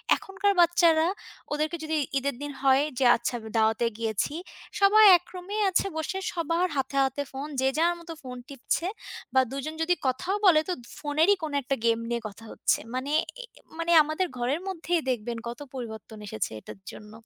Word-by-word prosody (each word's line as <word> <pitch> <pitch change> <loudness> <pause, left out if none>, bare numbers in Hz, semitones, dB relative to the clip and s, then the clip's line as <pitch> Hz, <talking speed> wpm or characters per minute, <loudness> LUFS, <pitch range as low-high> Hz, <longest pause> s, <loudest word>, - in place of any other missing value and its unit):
এখনকার 395 +1 0
বাচ্চারা, 335 -1 +4 0.5
ওদেরকে 310 +3 -1
যদি 315 0 -1 0.2
ঈদের 280 -1 -1
দিন 290 0 -4
হয় 270 0 +4 0.2
যে 260 - +3
আচ্ছা 245 - -3 0.2
দাওয়াতে 220 +1 +2
গিয়েছি, 225 +3 -1 0.5
সবাই 420 +2 +7
এক 355 - -20
রুমে 370 +3 -5
আছে 380 +1 +1
বসে 320 +4 -2 0.2
সবার 335 +1 0
হাতে, 270 0 -2
হাতে 270 +2 -1
ফোন। 270 +2 -5
যে 265 - +3
যার 340 +2 +3
মতো 335 0 -8
ফোন 250 -1 -7
টিপছে 280 +5 -2 0.5
বা 260 - +6
দুজন 275 +3 -4
যদি 355 +2 +2
কথাও 270 +10 -1
বলে, 330 -5 +7
তো 360 - +1 0.3
ফোনেরই 315 +7 +3
কোন 310 - -3
একটা 275 +2 -1
গেম 230 0 +3
নিয়ে 235 -1 -1
কথা 210 +2 -13
হচ্ছে। - - +1
মানে, 260 +3 -3 0.3
এ - - -8 0.3
মানে 335 +1 -1
আমাদের 310 +5 -1
ঘরের 270 +8 0
মধ্যেই 365 -4 -5 0.3
দেখবেন, 235 -1 -2
কত 235 +4 -6
পরিবর্তন 220 -3 -7
এসেছে 110 - -3
এটার 195 - -11
জন্য। 210 0 -12
290 Hz, 175 wpm, -27 LUFS, 250-345 Hz, 0.5 s, সবাই